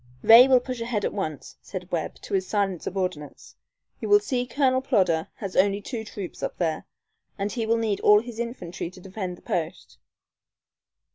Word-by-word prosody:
"Ray 235 +3 +9
will 260 -1 +6
push 250 -1 -6
ahead 230 -3 -1
at - - -2
once," 155 -8 -5
said 185 -1 -8
Webb, 165 -3 -2
to - - -8
his 190 -1 +1
silent 195 -5 0
subordinates. 180 -6 -5 0.4
"You 415 0 +4
see 255 -11 -2
Colonel 260 -1 +2
Plodder 185 - +1
has 195 -3 -6
only 200 +1 +3
two 220 +2 -5
troops 200 -4 -8
up - - -4
there, 160 -3 -2 0.5
and 200 0 -2
he 230 -3 -2
will 230 +1 +3
need 220 -3 -1
all 210 0 +6
his 235 -1 -9
infantry 180 -8 -5
to 185 - -14
defend 185 -1 -6
the - - -21
post. 170 +1 -4
200 Hz, 180 wpm, -25 LUFS, 180-235 Hz, 0.5 s, Ray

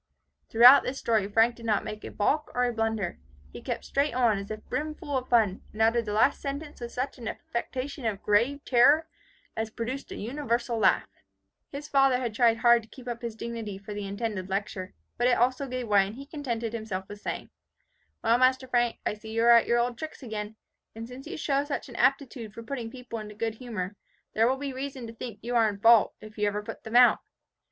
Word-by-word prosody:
'" - - -49
Throughout 245 +4 +9
this 265 - -4
story 220 -6 +1
Frank 225 +3 +3
did 230 - -11
not 210 -2 +2
make 215 0 -7
a - - -6
balk 295 +9 0
or 250 - +2
a 245 -1 +1
blunder. 225 -4 -2 0.3
He - - -8
kept - - -4
straight 280 -2 0
on, 235 -5 +3
as 200 - -8
if 215 0 -7
brimful 305 -1 -3
of 255 -1 -2
fun, 215 -5 +3
and 215 - -12
uttered 230 +1 +3
the 210 - -3
last 225 +6 +3
sentence 285 0 -6
with 235 0 -5
such 255 +1 -4
an 230 - -6
affectation 255 +3 -4
of 205 -2 -3
grave 240 +8 +2
terror, 285 +6 +5 0.5
as 220 0 -2
produced 240 +5 -5
a - - -5
universal 235 -1 -2
laugh. - - +3 0.6
His 290 +1 -6
father 270 -3 +4
had 240 -3 -3
tried 230 +1 +4
hard 235 0 +5
to 220 - -18
keep 255 0 -13
up 235 -1 -4
his 235 -2 -5
dignity 225 -3 -5
for 205 +2 -8
the 205 -1 -5
intended 200 -2 -4
lecture, 195 -1 -4 0.2
but 240 - +3
it 250 - +3
also 255 +3 +1
gave 255 -2 -4
way, 200 -2 +4
and 205 - -8
he 275 +2 -9
contented 240 -7 -4
himself 205 -5 -4
with 205 0 -10
saying, - - -5 0.7
"Well, 230 +2 +4
master 260 +1 +3
Frank, 240 -2 +1
I - - 0
see 215 +1 -11
you 225 +1 +1
are 235 - +7
at 235 -1 +6
your 235 - +3
old 240 0 0
tricks 310 -2 -7
again. 215 -2 -5 0.4
And 225 +1 -7
since 250 +2 -10
you - - -6
show 280 -2 +1
such 290 -2 -4
an 240 - -11
aptitude 255 -5 0
for 230 - -8
putting 235 -2 -5
people 245 -2 -7
into 210 -1 -9
good 225 +1 -2
humour, 210 -6 -5 0.4
there 225 +1 +3
will 260 +2 +1
be 275 -1 -4
reason 265 -1 -5
to 225 - -8
think 230 -2 -7
you 240 +1 -3
are 225 -2 +4
in 200 - -5
fault, 230 0 +5
if 215 0 -11
you 210 - +2
ever 205 0 -2
put - - -9
them 220 +1 -5
out. 245 0 +7
235 Hz, 225 wpm, -28 LUFS, 215-255 Hz, 0.7 s, Throughout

